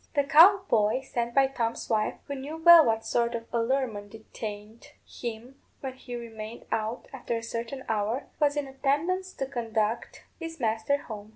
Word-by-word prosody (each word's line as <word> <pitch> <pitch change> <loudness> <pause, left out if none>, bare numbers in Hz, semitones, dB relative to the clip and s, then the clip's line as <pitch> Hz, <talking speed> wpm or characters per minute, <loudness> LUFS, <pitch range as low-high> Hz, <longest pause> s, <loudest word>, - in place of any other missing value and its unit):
The 285 - +3
cow 340 +8 +7
boy, 215 +3 +2
sent 235 -3 -3
by 275 -1 +6
Tom's 235 -4 -3
wife, 215 -2 0
who 285 - -5
knew 280 +4 -6
well 335 0 +9
what 225 -3 0
sort 235 0 0
of 230 0 -5
allurement 230 -3 -1
detained 215 0 -8 0.2
him 240 +3 -8 0.2
when 265 -1 -4
he 250 -1 -8
remained 225 -1 -8
out 220 +3 -2
after 245 -3 -3
a 230 - -6
certain 235 +3 -5
hour, 220 +4 -1 0.2
was 295 -1 +2
in 290 - 0
attendance 295 +8 -1
to 270 - -3
conduct 230 -4 -2 0.2
his 330 -1 -7
master 225 +4 0
home. 210 -2 -8
240 Hz, 170 wpm, -28 LUFS, 225-275 Hz, 0.2 s, well